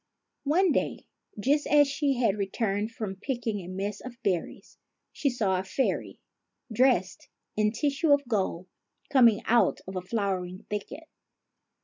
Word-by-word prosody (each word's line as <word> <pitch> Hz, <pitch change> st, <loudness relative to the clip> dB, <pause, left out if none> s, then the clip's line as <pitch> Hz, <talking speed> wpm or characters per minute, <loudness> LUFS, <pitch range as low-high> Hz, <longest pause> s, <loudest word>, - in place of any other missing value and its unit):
One 345 Hz, +5 st, +3 dB
day, -, -, -1 dB, 0.3 s
just 285 Hz, +7 st, +2 dB
as 290 Hz, -1 st, +5 dB
she 280 Hz, 0 st, 0 dB
had 235 Hz, -5 st, +2 dB
returned 205 Hz, +1 st, -1 dB
from 210 Hz, -4 st, -5 dB
picking 230 Hz, -2 st, -3 dB
a 175 Hz, -, -9 dB
mess 195 Hz, +2 st, -4 dB
of 255 Hz, -2 st, -9 dB
berries, 180 Hz, -4 st, -3 dB, 0.3 s
she 280 Hz, -, 0 dB
saw 205 Hz, -7 st, 0 dB
a -, -, -3 dB
fairy, 260 Hz, +8 st, -1 dB, 0.6 s
dressed 215 Hz, -7 st, +2 dB, 0.3 s
in 210 Hz, 0 st, +2 dB
tissue 285 Hz, +6 st, 0 dB
of 285 Hz, -2 st, +4 dB
gold, 190 Hz, -6 st, -1 dB, 0.5 s
coming 235 Hz, -6 st, +5 dB
out 235 Hz, +1 st, +3 dB
of 190 Hz, -, -7 dB
a 185 Hz, -, -2 dB
flowery 185 Hz, -2 st, -3 dB
thicket. 210 Hz, +9 st, -5 dB
220 Hz, 140 wpm, -28 LUFS, 195-270 Hz, 0.6 s, as